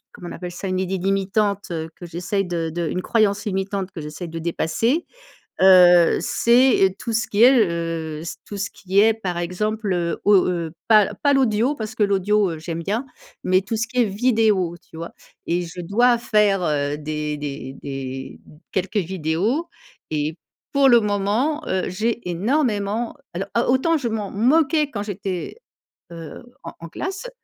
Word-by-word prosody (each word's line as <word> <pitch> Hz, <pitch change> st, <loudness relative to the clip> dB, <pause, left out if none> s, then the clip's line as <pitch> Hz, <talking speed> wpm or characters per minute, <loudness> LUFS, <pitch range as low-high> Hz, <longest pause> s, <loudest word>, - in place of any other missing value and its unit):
comment 175 Hz, -, -9 dB
on -, -, -7 dB
appelle 180 Hz, -1 st, -7 dB
ça? 185 Hz, +3 st, -5 dB
Une 185 Hz, 0 st, -1 dB
idée 190 Hz, 0 st, -2 dB
limitante, 195 Hz, +2 st, 0 dB
heu, 160 Hz, -1 st, -3 dB
que -, -, -10 dB
j'essaye 180 Hz, +4 st, -2 dB
de 170 Hz, -2 st, -2 dB
de 170 Hz, +1 st, -3 dB
une 180 Hz, -, -2 dB
croyance 210 Hz, -1 st, +1 dB
limitante 195 Hz, -1 st, -2 dB
que 170 Hz, -, -8 dB
j'essaye 150 Hz, +3 st, -7 dB
de 165 Hz, -, -6 dB
dépasser, 170 Hz, -, 0 dB, 0.6 s
heu, 180 Hz, -2 st, +7 dB
c'est, 245 Hz, +1 st, +3 dB
heu, 190 Hz, -, +4 dB
tout 230 Hz, -, -4 dB
ce 225 Hz, -, +1 dB
qui 210 Hz, +2 st, +1 dB
est, 255 Hz, -, +8 dB, 0.2 s
heu, 165 Hz, -2 st, -4 dB
c 170 Hz, -, -5 dB
tout 205 Hz, -, -7 dB
ce 205 Hz, -, -2 dB
qui 195 Hz, 0 st, +1 dB
est, 220 Hz, +1 st, +5 dB
par 185 Hz, -6 st, -4 dB
exemple, 205 Hz, +4 st, -2 dB
heu, 170 Hz, -1 st, -2 dB
au 205 Hz, 0 st, +6 dB
heu, 170 Hz, -3 st, -2 dB, 0.2 s
pas, 215 Hz, -3 st, +6 dB
heu, -, -, -10 dB
pas 285 Hz, -, +4 dB
l'audio 255 Hz, +1 st, +2 dB
parce 220 Hz, -3 st, -6 dB
que -, -, -1 dB
l'audio, 200 Hz, 0 st, +2 dB
heu, 160 Hz, -, -6 dB
j'aime 165 Hz, +1 st, -5 dB
bien. 220 Hz, +9 st, -2 dB, 0.4 s
Mais 185 Hz, +1 st, +3 dB
tout 220 Hz, +4 st, -3 dB
ce 225 Hz, -, -1 dB
qui 250 Hz, +1 st, 0 dB
est -, -, +3 dB
vidéo, 210 Hz, -4 st, +1 dB, 0.2 s
tu -, -, -12 dB
vois? 170 Hz, +1 st, -6 dB, 0.3 s
Et 175 Hz, +1 st, 0 dB
je 175 Hz, +1 st, -7 dB
dois 235 Hz, +7 st, +3 dB
faire, 210 Hz, -4 st, +2 dB
heu, 145 Hz, -2 st, 0 dB
des 150 Hz, 0 st, -3 dB
des 140 Hz, -2 st, -6 dB
des 135 Hz, -1 st, -6 dB
m 150 Hz, -, -17 dB
quelques 190 Hz, +3 st, -1 dB
vidéos 190 Hz, -, -1 dB, 0.4 s
et 155 Hz, +1 st, -2 dB, 0.4 s
pour 275 Hz, -1 st, +5 dB
le 240 Hz, -1 st, +7 dB
moment, 210 Hz, +9 st, 0 dB
heu, 185 Hz, 0 st, -1 dB
j'ai 225 Hz, +2 st, -2 dB
énormément 215 Hz, -, 0 dB, 0.2 s
alors, 195 Hz, +3 st, -4 dB
a 235 Hz, -, +1 dB
autant 325 Hz, +6 st, +2 dB
je 265 Hz, -, -4 dB
m'en 215 Hz, -3 st, -3 dB
moquais 290 Hz, +6 st, +2 dB
quand 205 Hz, -6 st, -4 dB
j'étais, 195 Hz, -3 st, -5 dB, 0.6 s
heu, 165 Hz, +3 st, -9 dB, 0.2 s
en -, -, -7 dB
en 165 Hz, -, -8 dB
classe 390 Hz, -, -5 dB
195 Hz, 185 wpm, -22 LUFS, 170-225 Hz, 0.6 s, est